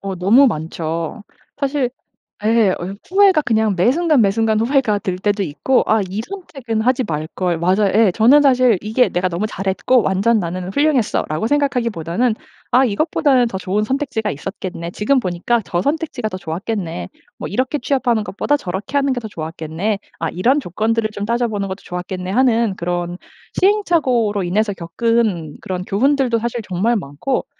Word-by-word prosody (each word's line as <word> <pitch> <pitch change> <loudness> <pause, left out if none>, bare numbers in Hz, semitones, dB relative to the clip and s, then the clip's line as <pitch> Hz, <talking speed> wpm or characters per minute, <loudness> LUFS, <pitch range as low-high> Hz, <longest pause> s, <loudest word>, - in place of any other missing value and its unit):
어 195 -1 -4
너무 215 +10 +5
많죠. 165 +1 -3 0.4
사실 275 -3 0 0.5
예, 220 -2 +4
어 185 +2 -4
후회가 385 -4 +5
그냥 220 -5 +1
매 185 +8 +3
순간 315 -4 +3
매 200 - +4
순간 220 +1 +1
후회가 235 -4 +2
될 185 -2 -3
때도 205 +1 0
있고 185 - +1
'아 220 -1 +3
이 200 +4 -3
선택은 270 - -4
하지 255 +2 +2
말걸.' 165 +1 -2
맞아요. 190 +3 +2
예. 215 -4 +5
저는 260 +8 +5
사실 255 -6 +4
이게 220 +5 +2
'내가 180 +1 0
너무 180 +5 -2
잘했고 195 +5 +1
완전 200 +5 +2
나는 180 +1 -4
훌륭했어.'라고 230 - +1
생각하기보다는 235 - 0 0.4
'아 260 +2 +5
이것보다는 255 +1 +2
더 190 - -4
좋은 195 +3 -1
선택지가 255 -3 -2
있었겠네. 175 +2 -6
지금 255 +8 +1
보니까 190 +4 0
저 175 0 -1
선택지가 285 - -2
더 185 - -5
좋았겠네. 170 - -4 0.3
뭐 - - -4
이렇게 255 +7 -1
취업하는 245 -4 0
것보다 250 +9 0
저렇게 195 +2 -3
하는 275 -1 +2
게 245 - -2
더 220 - -7
좋았겠네. 165 +4 -3 0.2
아 165 - -1
이런 250 +11 +2
조건들을 220 - -1
좀 205 -1 -4
따져보는 220 -3 -1
것도 190 - -6
좋았겠네.' 180 +1 -5
하는 230 -2 +2
그런 175 0 -3 0.4
시행착오로 275 - +2
인해서 205 +4 0
겪은 185 -2 -1
그런 180 -1 -4
교훈들도 255 +2 +2
사실 235 +1 -3
정말 205 +6 +1
많고 160 - -3
215 Hz, 370 characters per minute, -19 LUFS, 185-255 Hz, 0.5 s, 너무